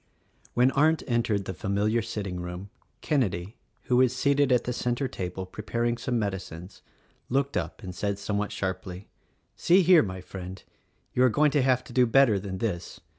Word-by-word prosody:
When 125 +2 +4
Arndt 155 +2 +3
entered 115 -5 0
the 95 - -4
familiar 105 +6 0
sitting 100 -4 -4
room, 90 +3 -7 0.3
Kenedy, 105 - -1 0.3
who 125 - +1
was 130 0 +4
seated 140 0 +2
at 125 -1 +4
the 125 - -2
center 125 +3 -1
table 95 -3 -5
preparing 115 +5 -2
some 120 0 -2
med 100 -3 0
icines, 90 0 -9 0.5
looked 140 +2 0
up - - -3
and 90 -1 -6
said 100 +3 -2
somewhat 100 0 -2
sharply, 95 0 -5 0.5
"See 185 +2 +4
here, 175 -1 +7
my 95 -3 -4
friend! 95 0 -8 0.5
you 125 - +1
are 130 - +6
going 150 +5 +3
to 145 - +2
have 130 -1 +2
to - - -12
do 125 -1 +4
better 115 -4 +4
than 95 -1 -5
this. 90 -4 -4
110 Hz, 180 wpm, -27 LUFS, 95-130 Hz, 0.5 s, here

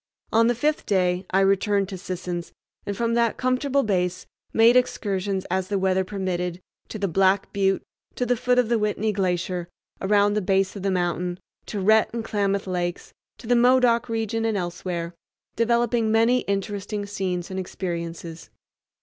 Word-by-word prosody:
On 230 +1 +5
the 240 - +2
fifth 300 +6 0
day 185 -2 +1
I 190 +1 +3
returned 195 +1 +2
to 195 - -5
Sisson's, 180 -2 -5 0.3
and 200 -1 -3
from 230 0 0
that 235 -1 +1
comfortable 260 +2 +1
base 180 -3 -1 0.3
made 230 +2 +5
excursions, 195 -6 0
as 185 0 0
the 205 0 -1
weather 190 0 +2
permitted, 180 -3 -3 0.3
to - - -6
the 200 -1 -1
Black 190 +2 +2
Butte, 195 -1 +1 0.3
to 250 - -1
the 245 +1 +2
foot 250 +2 +1
of 250 -2 +4
the 235 0 +1
Whitney 210 +1 0
Glacier, 180 -2 -1 0.3
around 205 +1 +3
the 210 - 0
base 195 +1 +1
of 200 - -6
the 195 - 0
mountain, 180 -1 -1 0.3
to 210 - -4
Rhett 215 +3 +4
and 230 -1 -3
Klamath 200 -2 0
Lakes, 175 -2 -3 0.2
to - - -13
the 245 +2 +3
Modoc 245 -1 +4
region 225 0 -1
and 225 -2 0
elsewhere, 175 -1 -4 0.4
developing 235 -1 +2
many 230 +3 +4
interesting 205 0 -3
scenes 185 -3 -3
and 190 - -3
experiences. 170 -2 -5
200 Hz, 165 wpm, -24 LUFS, 185-225 Hz, 0.4 s, On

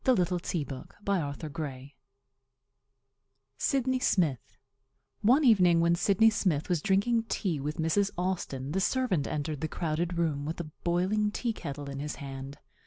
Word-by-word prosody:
[Illustration 180 -7 +1
of 130 - -9
Old 165 -7 -1
Russian 150 -2 -6
Samovar] 135 -4 -5 1.7
SYDNEY 260 -1 +1
SMITH 165 - 0 0.6
One 255 +8 +5
evening 180 -9 +5
when 170 0 +4
Sidney 200 +5 +4
Smith 175 -8 0
was 175 -4 +1
drinking 220 +5 +2
tea 170 -7 -1
with 150 +2 -3
Mrs. 165 +5 +2
Austin 170 -7 -2
the 190 +4 0
servant 210 - +1
entered 150 -1 -3
the 160 - 0
crowded 170 +2 -2
room 155 -4 0
with 160 +4 -4
a 155 -3 -6
boiling 190 +5 +1
tea 230 +2 -2
kettle 145 -6 -6
in 140 0 -5
his 150 +1 -4
hand. 135 0 -7
170 Hz, 150 wpm, -29 LUFS, 150-200 Hz, 1.7 s, One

